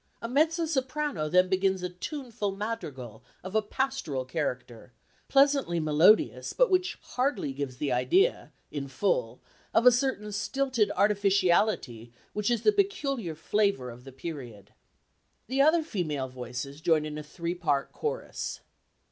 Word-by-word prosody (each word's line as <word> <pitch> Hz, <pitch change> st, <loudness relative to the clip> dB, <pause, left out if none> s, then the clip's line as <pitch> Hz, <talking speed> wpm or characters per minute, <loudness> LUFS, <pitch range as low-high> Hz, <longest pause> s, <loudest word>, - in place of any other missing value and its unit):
A 230 Hz, -, -5 dB
mezzo 320 Hz, +6 st, +2 dB
soprano 265 Hz, -, -1 dB
then 180 Hz, +2 st, +4 dB
begins 190 Hz, 0 st, +1 dB
a 180 Hz, -, -1 dB
tuneful 225 Hz, -, -4 dB
madrigal 145 Hz, -, -5 dB, 0.2 s
of 185 Hz, +1 st, -7 dB
a 220 Hz, -, +3 dB
pastoral 210 Hz, -, -2 dB
character, 125 Hz, -5 st, -4 dB, 0.3 s
pleasantly 275 Hz, -10 st, +3 dB
melodious 155 Hz, +7 st, +3 dB
but -, -, +3 dB
which 370 Hz, 0 st, +1 dB
hardly 250 Hz, -, -1 dB
gives 135 Hz, -2 st, -5 dB
the 145 Hz, 0 st, -2 dB
idea, 370 Hz, -, +2 dB, 0.2 s
in 140 Hz, -2 st, -4 dB
full, 130 Hz, -, -1 dB, 0.4 s
of 230 Hz, -, +4 dB
a 250 Hz, -, +10 dB
certain 245 Hz, -4 st, -1 dB
stilted 255 Hz, +2 st, 0 dB
artificiality 195 Hz, -, +2 dB, 0.2 s
which 210 Hz, +1 st, -1 dB
is 235 Hz, -2 st, 0 dB
the -, -, +6 dB
peculiar 280 Hz, -, -1 dB
flavour 180 Hz, -, 0 dB
of 120 Hz, +1 st, -13 dB
the 135 Hz, -, -11 dB
period. 130 Hz, -, -8 dB, 0.7 s
The 265 Hz, +4 st, +1 dB
other 315 Hz, +3 st, +5 dB
female 155 Hz, -, -3 dB
voices 130 Hz, +3 st, -7 dB
join 160 Hz, -2 st, +2 dB
in 150 Hz, 0 st, -5 dB
a -, -, -5 dB
three 170 Hz, +3 st, -4 dB
part 145 Hz, -6 st, -1 dB
chorus. 470 Hz, +2 st, -4 dB
190 Hz, 140 wpm, -28 LUFS, -, 0.7 s, a